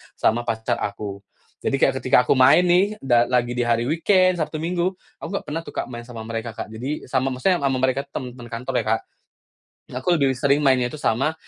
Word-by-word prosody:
sama 120 Hz, +2 st, +1 dB
pacar 115 Hz, +1 st, -1 dB
aku. 100 Hz, -1 st, -4 dB, 0.4 s
Jadi -, -, +1 dB
kayak -, -, +3 dB
ketika -, -, +4 dB
aku 130 Hz, -, +2 dB
main 140 Hz, +7 st, +6 dB
nih 185 Hz, +4 st, +3 dB
da 120 Hz, -2 st, +3 dB
lagi 120 Hz, -1 st, +1 dB
di 125 Hz, -, +1 dB
hari 115 Hz, 0 st, +2 dB
weekend, 185 Hz, +3 st, +3 dB
Sabtu 155 Hz, 0 st, -2 dB
Minggu, 180 Hz, +2 st, -1 dB, 0.2 s
aku -, -, -6 dB
nggak -, -, -3 dB
pernah 150 Hz, +2 st, -3 dB
tuh -, -, -11 dB
Kak -, -, -3 dB
main 120 Hz, -1 st, -7 dB
sama 115 Hz, -3 st, -8 dB
mereka 115 Hz, 0 st, -5 dB
Kak 110 Hz, -, -6 dB
jadi 130 Hz, +7 st, -4 dB
sama 130 Hz, +1 st, 0 dB
maksudnya 180 Hz, +8 st, +1 dB
sama 135 Hz, -2 st, 0 dB
mereka 130 Hz, +1 st, +2 dB
temen-temen 125 Hz, -2 st, -6 dB
kantor 115 Hz, +2 st, -2 dB
ya -, -, -17 dB
Kak. -, -, -16 dB, 0.9 s
Aku 130 Hz, +8 st, 0 dB
lebih 140 Hz, -4 st, +2 dB
sering 140 Hz, +2 st, +2 dB
mainnya 130 Hz, -3 st, +3 dB
itu 125 Hz, -, -7 dB
sama, 135 Hz, +8 st, +1 dB
130 Hz, 210 wpm, -22 LUFS, 120-155 Hz, 0.9 s, main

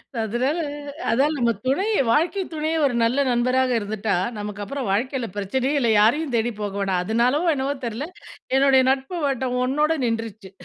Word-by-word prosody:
அ -, -, -2 dB
அதனால 250 Hz, +9 st, -1 dB, 0.5 s
அதான் 280 Hz, +6 st, +2 dB
நம்ம 235 Hz, -2 st, +2 dB
துணை, 280 Hz, +10 st, +1 dB, 0.2 s
வாழ்க்கை 340 Hz, -, +2 dB
துணையே 315 Hz, +1 st, -1 dB
ஒரு 250 Hz, -3 st, 0 dB
நல்ல 240 Hz, +4 st, +2 dB
நண்பராக 255 Hz, +1 st, +2 dB
இருந்துட்டா, 210 Hz, -1 st, -2 dB, 0.2 s
நமக்கப்புறம் 210 Hz, +4 st, -5 dB
வாழ்க்கைல 245 Hz, +3 st, -1 dB
பரச்சனையே 255 Hz, +8 st, -1 dB
இல்ல, 235 Hz, -3 st, +2 dB
யாரையும் 270 Hz, +6 st, +2 dB
தேடிப் 225 Hz, -1 st, -1 dB
போக 205 Hz, -1 st, -3 dB
வேணாம். 190 Hz, -2 st, 0 dB
அதனாலோ 240 Hz, -, +1 dB
என்னவோ 275 Hz, +1 st, -1 dB
தெர்ல, 235 Hz, +7 st, -4 dB, 0.5 s
என்னுடைய 270 Hz, -1 st, +5 dB
நட்பு 270 Hz, +6 st, -2 dB
வட்டம் 260 Hz, -2 st, -1 dB
ஒன்னோட 300 Hz, +5 st, +1 dB
நின்றுச்சு. 220 Hz, -4 st, -4 dB
250 Hz, 150 wpm, -23 LUFS, 220-275 Hz, 0.5 s, என்னுடைய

